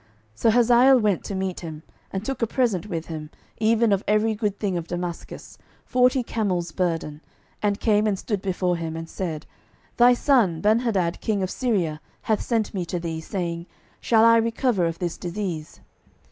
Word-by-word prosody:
12:008:009 - - -33 0.3
So 225 - +2
Hazael 245 +3 +6
went 210 -5 +1
to 200 - -4
meet 190 -1 -2
him, 160 -2 -8 0.3
and 195 +2 -4
took 270 -2 -3
a 230 - +2
present 215 -7 0
with 165 -4 -4
him, 155 -2 -7 0.3
even 225 0 +3
of 195 0 +1
every 215 +1 +2
good 210 -2 -2
thing 200 -4 -1
of 170 -1 -3
Damascus, 175 -1 -6 0.3
forty 250 +1 +3
camels' 185 -8 -2
burden, 165 -4 -2 0.4
and 205 -1 0
came 215 -1 +2
and 200 -2 0
stood 205 0 -3
before 180 -2 0
him, 165 -1 -4
and 165 0 -6
said, 165 -4 -5 0.5
Thy 245 +1 +6
son 235 - +2
Benhadad 210 -5 +1
king 205 -3 0
of 185 - -2
Syria 180 -11 -1 0.2
hath 215 -2 +1
sent 225 -3 -1
me 190 -3 -2
to 175 +1 -3
thee, 165 -1 -4
saying, 170 -1 -4 0.3
Shall 225 -1 +4
I 230 0 +7
recover 230 -4 +1
of 165 0 -4
this 175 -1 -4
disease? 175 -4 -5
195 Hz, 180 wpm, -24 LUFS, 170-225 Hz, 0.5 s, I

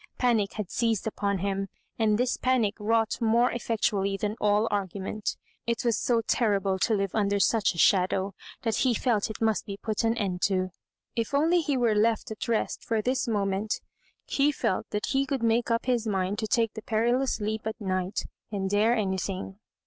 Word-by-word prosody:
Panic 230 -5 +2
had 210 -4 -5
seized 230 -4 0
upon 200 -2 -1
him, 195 +1 -2 0.3
and 215 -2 +3
this 250 +2 +1
panic 250 -5 +1
wrought 225 +2 +1
more 235 +2 +3
effectually 205 -4 0
than 210 +1 -2
all 210 +1 +3
argument 200 +1 -3 0.3
It 235 +1 -1
was 235 -2 +3
so 235 -2 +2
terrible 200 -5 +1
to 220 - +2
live 195 -2 -1
under 200 -2 +1
such 210 -2 +2
a - - -9
shadow, 190 +2 +3 0.3
that 225 -2 0
be 255 -3 +3
felt 220 -3 +1
it 220 - -6
must 220 -2 0
oe 200 - -3
put 215 0 -2
an 230 +1 +1
end 185 -4 -2
ta 185 -2 +1 0.5
If 230 +4 -1
only 330 +5 +4
he 290 -4 0
were 235 -3 +3
left 220 +1 +1
at 220 - -5
rest 230 -2 -1
for 220 -2 -1
this 255 +2 0
moment, 200 -1 0 0.5
he 285 +1 +2
felt 190 -9 -1
that 210 - -2
he 270 0 +1
could 265 -3 -2
make 230 +1 +2
up 230 0 +1
his 240 -3 +1
mind 195 0 -1
to 220 - -2
take 225 -1 +1
the 220 - -7
perilous 240 +5 +1
leap 215 +1 -2
at 220 - -4
night, 185 -1 -2 0.3
and 195 -2 -2
dare 215 +4 +3
anything. 190 -1 -2
215 Hz, 190 wpm, -27 LUFS, 200-235 Hz, 0.5 s, only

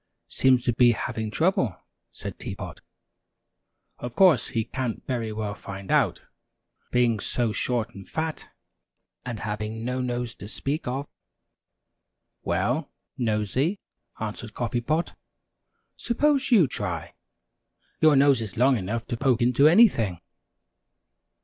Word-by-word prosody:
"Seems 130 -2 +3
to 120 - +2
be 120 0 +5
having 110 0 -3
trouble," 130 - +1 0.3
said - - -7
Tea - - -5
Pot. - - -8 1.2
"Of 120 -1 -6
course, 175 - +5
he 115 - -1
can't 125 -1 -4
very 115 -4 -2
well 105 -1 -3
find 100 -1 -8
out - - +2 0.7
being 120 -3 +2
so 120 +2 0
short 115 0 -1
and 100 -2 -11
fat, 160 0 -3 0.7
and 120 -3 -5
having 110 +1 -4
no 125 +1 -1
nose 120 -2 -2
to 100 - -9
speak 140 +7 -3
of." 135 +3 -3 1.3
"Well, 115 - -1 0.3
Nosey," 125 - 0 0.4
answered 110 +1 -5
Coffee 120 0 -1
Pot, 155 +8 -1 0.8
"suppose 275 +3 +1
you 205 - +6
try 95 -9 -4 0.9
your 155 -2 +6
nose 135 -3 +5
is 110 0 -6
long 130 0 +4
enough 110 +5 -3
to 120 - -4
poke 130 -2 +2
into 125 +4 +5
anything!" 155 - +5
120 Hz, 125 wpm, -26 LUFS, 110-140 Hz, 1.3 s, you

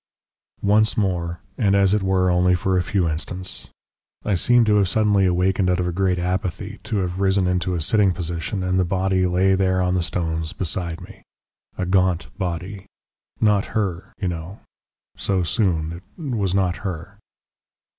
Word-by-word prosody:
"Once 110 +2 +3
more, 90 -4 -1 0.2
and 100 -4 +3
as 100 0 +4
it 105 - +2
were 95 -1 +2
only 90 +1 +3
for 95 +1 0
a 90 - +3
few 90 0 0
instants. 90 +4 -4 0.6
I 105 - +1
seemed 120 +6 +4
to 105 -1 +3
have 100 -3 +2
suddenly 105 -2 +3
awakened 90 +1 +1
out 90 0 +1
of 90 - 0
a - - -1
great 95 0 +1
apathy, 95 +3 -3
to 110 - -2
have 90 0 -3
risen 95 -1 +2
into 90 0 0
a 85 - -2
sitting 100 +4 +3
position, 85 +2 -3
and 90 0 +1
the - - +4
body 95 +1 +1
lay 95 +2 +3
there 95 -1 +2
on 90 0 +1
the 90 - +1
stones 80 -2 -2
beside 85 0 -3
me. 90 - -12 0.6
A 90 - -1
gaunt 90 -1 +1
body. 90 +2 -4 0.5
Not 105 -2 +3
her, 95 -3 -2
you 95 - -2
know. 85 +3 -6 0.6
So 95 -2 0
soon 85 -5 0 0.3
it 150 -7 -4
was 95 -4 0
not 95 -3 +1
her.... 95 +2 -6
95 Hz, 175 wpm, -22 LUFS, 90-100 Hz, 0.6 s, as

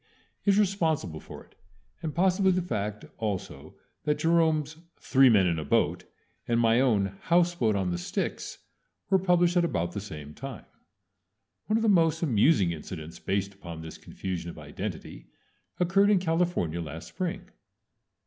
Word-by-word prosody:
K. - - +3
is 200 - +5
responsible 160 - 0
for - - -11
it, - - -27 0.5
and 160 -4 -4
possibly 190 +2 +3
the 185 -1 0
fact 105 - -3
also 105 -4 -4 0.3
that 150 0 +1
Jerome's 160 -2 +2 0.2
"Three 135 -1 +5
Men 100 -5 +5
in 85 -3 +1
a - - -3
Boat" - - +1 0.4
and 115 0 +2
my 115 0 +4
own 100 -7 +1
"House 175 +1 +3
Boat 115 -10 +1
on 95 -2 0
the 85 - -2
Styx" 85 - -3 0.5
were 190 - +5
published 175 -1 +3
at 175 - +4
about 85 - -1
the 100 - -5
same 75 -7 -9
time. 135 - -8 1.0
One 215 - +2
of 225 - -1
the - - +2
most 165 -5 +3
amusing 115 - +3
incidents 80 0 -7
based 100 +1 -2
upon 85 -4 -9
this 80 - -9
confusion 90 -3 -5
of - - -10
identity 70 -4 -7 0.5
occurred 195 +3 +4
in 210 - +5
California 165 - 0
last 80 +2 -7
spring. 185 +1 -4
130 Hz, 160 wpm, -28 LUFS, -, 1.0 s, is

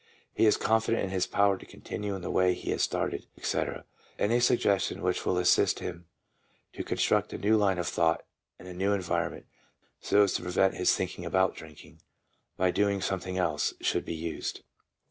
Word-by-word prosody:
He 110 - +3
is 105 - +4
confident 110 +1 +1
in 95 - -3
his 95 -1 0
power 100 -1 +2
to - - -12
continue 105 -1 -5
in 95 - -7
the - - -3
way 90 -1 +3
he - - -4
has - - -1
started, - - -1
etc. - - -2 0.3
Any 115 +4 +2
sug 120 0 +4
gestion 100 -3 0
which 90 0 -1
will 90 - +2
assist 90 0 +3
him 85 0 -7 0.7
to - - -5
construct - - +1
a - - -3
new 105 +5 +2
line 100 -3 +2
of 85 - -2
thought 80 -1 +1 0.3
and 90 - -13
a 90 - -7
new 95 +3 0
environment, 95 -4 -2 0.5
so 105 - +4
as 100 - +1
to - - -1
prevent 90 +2 +2
his 90 - +2
thinking 90 -1 -4
about 95 +2 +1
drinking, 80 -2 -13 0.6
by 90 0 +2
doing 100 0 +1
something 95 -1 -3
else, 90 - 0
should - - 0
be 85 - -5
used. 80 0 -4
95 Hz, 190 wpm, -29 LUFS, 90-100 Hz, 0.7 s, is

